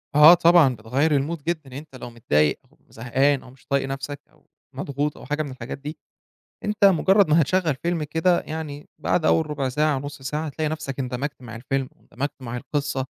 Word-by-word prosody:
آه 150 +3 +10
طبعًا 170 -6 +5
بتغيّر 125 +8 0
الMood 150 +2 -4
جدًا، 170 +1 -1
يعني 130 0 -9
أنت 150 -2 -14
لو 125 - -8
متضايق 75 -11 +1
أو - - -27
زهقان 135 +4 +1
أو - - -14
مش 130 0 -22
طايق 140 -1 0
نَفْسك 135 +1 -5
أو 155 - -29 0.3
مضغوط 140 +2 -3
أو - - -11
حاجة 150 +3 -1
من 145 - -7
الحاجات 130 -1 -7
دي، 145 +3 -7 0.7
أنت 210 0 0
مجرّد 195 +1 +5
ما 160 +2 +5
هتشغّل 165 0 +1
فيلم 170 -2 -1
كده، 160 +4 +2
يعني 155 -2 -7
بعد 160 - 0
أول 160 -1 +2
ربع 140 -3 -1
ساعة 150 +3 +1
أو 135 - -2
نُص 145 0 -8
ساعة، 150 +4 -3
هتلاقي 155 +1 -2
نَفْسك 150 -4 -5
اندمجت 130 +2 -4
مع 115 -2 -8
الفيلم 135 +2 -2
واندمجت 140 +3 -5
مع 120 -1 -5
القصة، 140 +1 -2
145 Hz, 200 wpm, -23 LUFS, 130-155 Hz, 0.7 s, آه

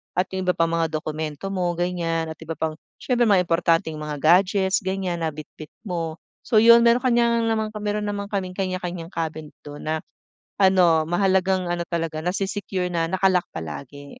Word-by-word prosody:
at 185 +1 0
yung 190 -1 -3
iba 180 - +2
pang 165 0 +1
mga 165 -1 +1
dokumento 155 +3 -4
mo 180 -2 -1
ganyan 165 -2 -1
at 160 - -10
iba 165 0 -6
pang 160 +1 -2 0.2
siyempre 245 -2 +1
mga 190 -3 +4
importanteng 165 -2 +1
mga 150 -1 -4
gadgets 190 +3 +4
ganyan 190 -3 -3
na 165 - -1
bitbit 155 0 -9
mo. 165 -5 -3 0.3
So 235 - -1
yun 235 +2 +7
may 235 - +6
kanya 235 -2 +2
naman 220 -1 0 0.2
meron 210 0 -1
naman 200 0 -4
kaming 185 -2 -3
kanya-kanyang 180 -2 -4
cabinet 155 -2 -4
don 145 0 -10
na 155 0 -1 0.6
ano, 180 -5 +5
mahalagang 185 +1 +1
ano 175 0 -1
talaga 165 -2 -3
nase-secure 190 0 -2
na 165 -1 0
naka-lock 185 -2 +2
palagi. 140 - -7
180 Hz, 170 wpm, -23 LUFS, 160-195 Hz, 0.6 s, yun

